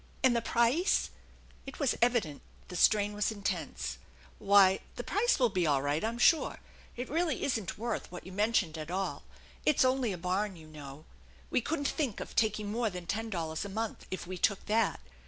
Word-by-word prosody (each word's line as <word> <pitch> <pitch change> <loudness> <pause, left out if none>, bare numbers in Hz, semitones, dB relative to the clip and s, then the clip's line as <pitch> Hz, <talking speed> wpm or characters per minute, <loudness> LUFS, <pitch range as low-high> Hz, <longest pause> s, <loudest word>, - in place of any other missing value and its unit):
"And 255 -2 +5
the 235 - +2
price? 235 - +2 0.3
" - - -27
It 270 - -8
was 280 -5 +2
evident 230 - +1 0.3
the 180 - -7
strain 205 +2 +4
was 210 +1 0
intense. 205 -3 -3 0.2
" - - -25
Why, 195 -1 +5 0.2
the - - -5
price 480 +4 +2
will 245 -3 +3
be 180 -4 0
all 140 -2 +2
right, 145 +4 0
I'm 230 +2 -1
sure. 315 +6 +4 0.4
It 245 - -4
really 325 -1 0
isn't 225 -9 -1
worth 230 -3 -3
what 180 - -8
you 185 - -9
mentioned 200 -5 +1
at 155 +1 -6
all. 190 +2 -2 0.4
It's 300 -3 +4
only 255 -3 +2
a 185 - -4
barn, 185 +3 -1
you 160 -2 -13
know. 150 -1 -10 0.5
We - - +2
couldn't 285 +2 -1
think 275 -10 -2
of - - -7
taking 215 -2 +1
more 230 0 0
than 180 -2 -7
ten 225 +5 -2
dollars 160 -5 -3
a 200 - -6
month, 220 +2 -4
if 185 - -4
we 185 0 -6
took 200 +1 +1
that. 220 - +1
210 Hz, 200 wpm, -31 LUFS, 180-240 Hz, 0.5 s, And